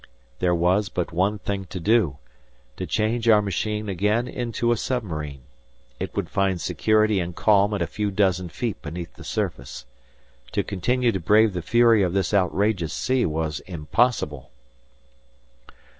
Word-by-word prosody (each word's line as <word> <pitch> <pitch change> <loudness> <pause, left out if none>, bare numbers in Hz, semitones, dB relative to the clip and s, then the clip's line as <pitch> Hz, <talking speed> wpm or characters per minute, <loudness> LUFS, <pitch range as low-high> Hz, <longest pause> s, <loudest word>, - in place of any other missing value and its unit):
There 90 -1 +2
was 90 +4 +2
but 90 -3 -3
one 95 +5 +1
thing 100 -1 -4
to 90 +2 -7
do—to 90 - -2
change 115 +2 0
our 110 -2 +7
machine 105 +2 -2
again 105 +5 0
into 120 -1 -1
a - - +3
submarine. 80 - -4 0.6
It - - -5
would - - -1
find 95 -2 0
security 110 +2 +2
and 85 -1 -4
calm 105 -1 +3
at - - -1
a - - 0
few 105 -1 -2
dozen 95 -3 +1
feet 115 +6 -4
beneath 85 +2 -7
the - - -13
surface. 60 - -4 0.7
To - - +1
continue 120 +6 0
to 95 - -2
brave 105 +4 +4
the 90 - -3
fury 115 +3 +4
of 90 -2 +1
this 95 0 0
outrageous 95 -3 +1
sea 130 0 +1
was 80 -1 -2
impossible. 75 - 0
100 Hz, 150 wpm, -24 LUFS, 85-110 Hz, 0.7 s, our